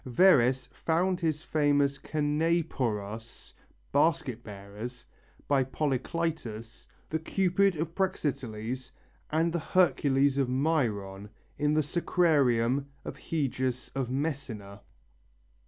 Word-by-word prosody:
Verres 130 -3 +5
found 175 +3 0
his 155 -3 -1
famous 145 -2 +2
canephoros 145 -9 -1 0.4
(basket 145 -6 +1
bearers) 105 +4 -8 0.4
by 140 -2 +3
Polycletus, 130 -4 -3 0.2
the 160 - -2
Cupid 190 +3 +2
of 160 +1 -3
Praxiteles 130 - -2 0.4
and 165 +2 +1
the 170 - 0
Hercules 140 -5 +3
of 135 -2 +1
Myron 110 -9 0 0.3
in 150 +1 +2
the 155 - +3
sacrarium 140 -6 +2 0.2
of - - -5
Heius 130 -5 -2
of 135 -3 -2
Messina. 125 -8 -4
140 Hz, 95 wpm, -29 LUFS, 120-160 Hz, 0.4 s, Verres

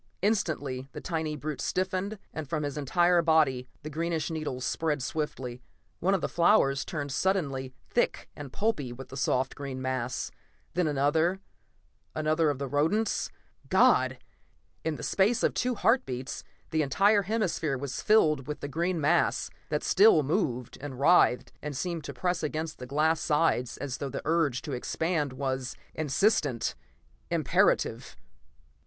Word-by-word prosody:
Instantly 145 -11 0
the - - -6
tiny 160 -3 -2
brute 150 +1 -4
stiffened, 190 +3 -1 0.2
and 155 -4 -5
from 155 -2 -1
his 145 -1 -3
entire 175 +5 +3
body 150 -6 +3 0.2
the 155 - -5
greenish 165 +1 -1
needles 150 -5 -3
spread 150 -4 -1
swiftly. 130 -4 -4 0.4
One 195 +3 +2
of 190 - -1
the - - 0
flowers 170 -7 +3
turned 145 -3 -4
suddenly 135 -8 -1
thick - - 0
and 145 -3 -8
pulpy 200 - -1
with 130 +2 -9
the 135 - -9
soft 130 -1 0
green 135 -2 -6
mass, 130 -1 -2 0.4
then 180 -2 +1
another, 155 +6 +2 0.8
another 155 +1 +2
of 145 - -1
the 140 - -3
rodents... 160 - +1 0.4
God! - - +4 0.7
In 160 -1 -1
the - - -8
space 205 +5 +2
of - - +3
two 250 -1 0
heart 230 +6 +3
beats, 125 +1 -5 0.3
the 160 -1 +2
entire 200 +9 +4
hemisphere 185 -8 -1
was 135 0 -4
filled 155 -11 +3
with 150 - -5
the - - -3
green 170 +4 -1
mass, 160 +3 +2 0.2
that 150 -1 -1
still 195 -6 +6
moved 130 - -1
and 135 -3 -7
writhed 140 -4 +4
and 150 -3 -5
seemed 170 +1 -3
to - - -5
press 180 -2 -1
against 155 +1 -3
the 125 - -7
glass 155 +4 +2
sides 150 -6 +1
as 135 -3 -4
though 140 - -3
the - - -5
urge 155 -6 +1
to 150 - -5
expand 150 +3 -1
was 130 -1 -3 0.2
insistent, 155 - +1 0.6
imperative.... - - +1
155 Hz, 155 wpm, -29 LUFS, 135-175 Hz, 0.8 s, still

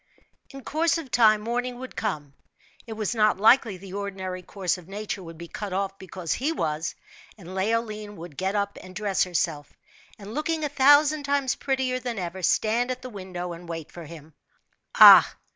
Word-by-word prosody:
In 275 -1 -11
course 325 +5 +1
of 300 -7 -8
time 215 -3 +5
morning 245 +2 -3
would 260 +1 -9
come 150 -10 -3 0.5
it 225 - -5
was 215 0 -2
not 215 -3 +3
likely 220 -1 +4
the 190 0 -11
ordinary 190 -2 -5
course 185 0 -2
of 175 - -16
nature 205 0 -5
would 165 -2 -10
be 170 +1 -9
cut 200 +2 -6
off 195 +1 -2
because 185 -3 -4
he 285 +5 -1
was; 160 - -2 0.4
and 185 -2 -11
Leoline 215 +1 -2
would 170 -4 -10
get 190 +4 -2
up 200 0 -2
and 185 0 -13
dress 205 -3 0
herself, 165 -4 -2 0.5
and 205 +1 -10
looking 310 +3 -2
a 295 - -1
thousand 290 +2 +5
times 280 -2 0
prettier 260 -2 -1
than 245 -2 -5
ever, 185 0 -5
stand 225 +7 +1
at 255 0 -4
the 255 - -7
window 180 -3 -6
and 170 0 -11
wait 165 -2 -6
for 170 -2 -10
him. 160 -1 -12 0.6
Ah! - - +9
205 Hz, 185 wpm, -25 LUFS, 180-245 Hz, 0.6 s, Ah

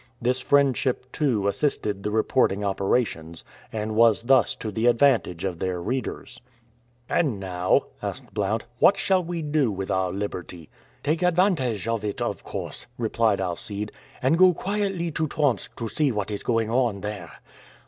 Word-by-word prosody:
This 125 +2 +1
friendship 130 -2 +2
too 120 -10 0
assisted 105 -4 0
the 105 - -2
reporting 110 -1 +1
operations, 95 -5 -1 0.3
and 110 0 -3
was 115 0 +4
thus 130 0 +4
to 110 - -5
the 110 +4 0
advantage 115 -8 +3
of 90 -3 -3
their 95 -1 -2
readers. 130 +9 -4 0.7
"And 135 - +1
now," 90 -1 +1 0.2
asked - - -6
Blount, 105 +2 -1
"what 200 - +6
shall 190 -1 +2
we 170 -1 -4
do 145 -5 +1
with 95 -1 -4
our 95 -1 +1
liberty?" 90 -4 -6 0.3
"Take 155 +4 0
advantage 170 - +2
of 115 -2 -1
it, 105 -1 -3
of - - -3
course," - - -6
replied 115 -2 +1
Alcide, 100 +3 -3 0.3
"and 160 +6 +3
go 185 -2 +7
quietly 195 -3 -2
to 155 +1 -1
Tomsk 145 -7 -1
to 115 - -3
see 145 +4 +1
what 105 -2 -3
is 100 - -3
going 115 -2 0
on 120 -5 +1
there." 95 -8 -6
115 Hz, 160 wpm, -25 LUFS, 100-140 Hz, 0.7 s, go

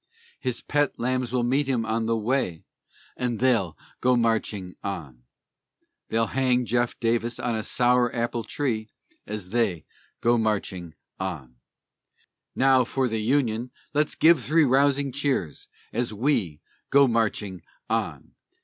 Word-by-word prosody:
His 125 -2 -2
pet 145 -1 +1
lambs 125 0 -1
will 125 -1 +1
meet 135 +4 +1
him 120 -4 0
on 110 0 -1
the 115 0 +1
way, 110 -7 -1 0.5
And 120 -3 -2
they'll 115 -10 +2 0.2
go 125 0 +3
marching 110 -5 0
on. 70 -11 -6 0.8
They'll 115 +1 +2
hang 130 -2 +2
Jeff 120 0 0
Davis 115 0 0
on 120 -1 -1
a 110 - -1
sour 125 +2 +3
apple 120 0 -1
tree, 110 -7 -2 0.4
As 105 -3 -5
they 110 -8 0 0.3
go 120 0 +3
marching 95 -6 -2 0.2
on. 75 -10 -5 1.0
Now 130 -1 +5
for 130 +2 0
the 110 -2 -2
Union 120 -1 +1 0.2
let's 150 0 +1
give 160 -5 +5
three 160 +1 +4
rousing 140 +1 +3
cheers, 135 - -2 0.3
As 120 +1 -1
we 105 - 0 0.3
go 140 0 +6
marching 105 -5 -1 0.3
on. - - -2
120 Hz, 135 wpm, -25 LUFS, 105-130 Hz, 1.0 s, go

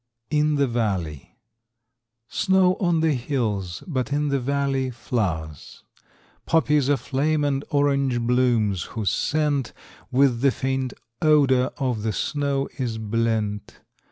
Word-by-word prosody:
In 150 0 +2
the 140 -1 +3
Valley. 95 - -3 0.9
Snow 190 - +3
on 175 -4 +2
the 160 -1 +3
hills, 110 - -2
but 135 -7 -2
in 145 +1 0
the 140 -1 +1
valley, 135 0 0
flowers, 90 - -4 0.6
Poppies 150 -4 +2
aflame 145 +3 +1
and 140 -1 0
orange 140 -3 +1
blooms, 115 -5 +1 0.2
whose 105 -5 +1
scent 145 -1 0 0.4
With 125 -2 +3
the 140 - +5
faint 130 0 -2 0.3
odor 140 -5 +4
of 125 -6 -1
the 110 0 -1
snow 140 +4 -1
is 120 -4 -2
blent. 110 -1 -2
130 Hz, 120 wpm, -24 LUFS, 115-145 Hz, 0.9 s, the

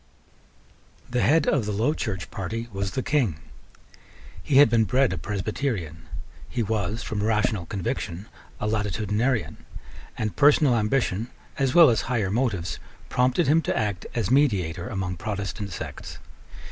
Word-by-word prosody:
The 125 -1 +1
head 155 +1 +4
of 125 -8 +1
the - - -1
Low 110 +9 +1
Church 95 - -4
party 110 +5 -4
was 100 0 -3
the 130 - -2
King. 130 - +1 1.1
He 135 - +1
had 145 - +9
been 115 0 +3
bred 130 -1 +2
a - - -3
Presbyterian: 95 - -3 0.4
he 120 - -1
was, 110 +1 -2
from 105 -1 -3
rational 105 -4 0
conviction, 95 -1 -4 0.3
a - - -3
Latitudinarian; 105 - -1 0.6
and 110 -1 -2
personal 145 -2 +5
ambition, 110 -1 0 0.3
as 135 -2 +1
well 165 -7 +8
as 115 - +1
higher 110 -7 -1
motives, 100 - -1 0.3
prompted 130 +6 +2
him 155 +4 +4
to - - -1
act 105 -5 -2
as 115 -2 -1
mediator 100 - +2
among 95 -6 -3
Protestant 100 +1 -4
sects. - - -7
110 Hz, 145 wpm, -25 LUFS, 100-125 Hz, 1.1 s, had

